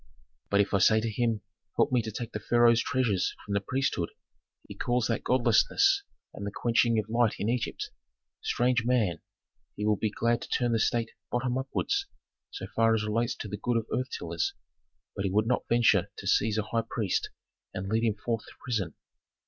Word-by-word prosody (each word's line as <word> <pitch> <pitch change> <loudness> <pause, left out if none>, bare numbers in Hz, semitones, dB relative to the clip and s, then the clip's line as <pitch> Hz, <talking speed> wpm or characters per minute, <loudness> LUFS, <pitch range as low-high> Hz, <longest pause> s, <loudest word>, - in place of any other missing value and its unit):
But 100 0 +4
if 100 - -2
I 100 - +4
say 110 +3 +5
to 110 0 -2
him: 115 -1 0 0.4
help - - +3
me 125 -2 +3
to 110 -1 -5
take 115 +2 -5
the 105 - -4
pharaoh's 120 +1 +4
treasures 115 -8 0
from 100 - -4
the 100 - +1
priesthood, 130 -7 -1 0.6
he - - -7
calls 120 -1 0
that 115 -1 -1
godlessness 130 - +3 0.3
and - - -7
the 100 - -2
quenching 115 +1 +2
of 110 -2 0
light 115 0 +2
in 105 - -1
Egypt. 120 -1 -2 0.5
Strange 120 -1 +1
man, 110 -10 +1 0.5
he 105 - -3
would 105 -1 +2
be 110 - +1
glad 115 +2 0
to - - -8
turn 120 -1 +1
the 115 - +2
state 115 0 +1 0.2
bottom 125 0 0
upwards, 265 - -1 0.4
so - - -6
far 115 0 +4
as 110 - 0
relates 115 +3 0
to - - -6
the 105 0 -5
good 120 +3 0
of 115 - -1
earth 130 +2 -1
tillers, 85 -6 -2 0.6
but 100 - -2
he 100 - +1
would 105 +3 +2
not 125 +2 0
venture 120 0 +4
to - - -8
seize 110 0 +2
a 110 - +1
high 115 +2 0
priest 105 -6 -1 0.4
and 95 +1 -5
lead 110 +3 +1
him 110 -3 +2
forth 115 +1 -2
to - - -12
prison. 105 -10 -2
115 Hz, 200 wpm, -29 LUFS, 105-120 Hz, 0.6 s, say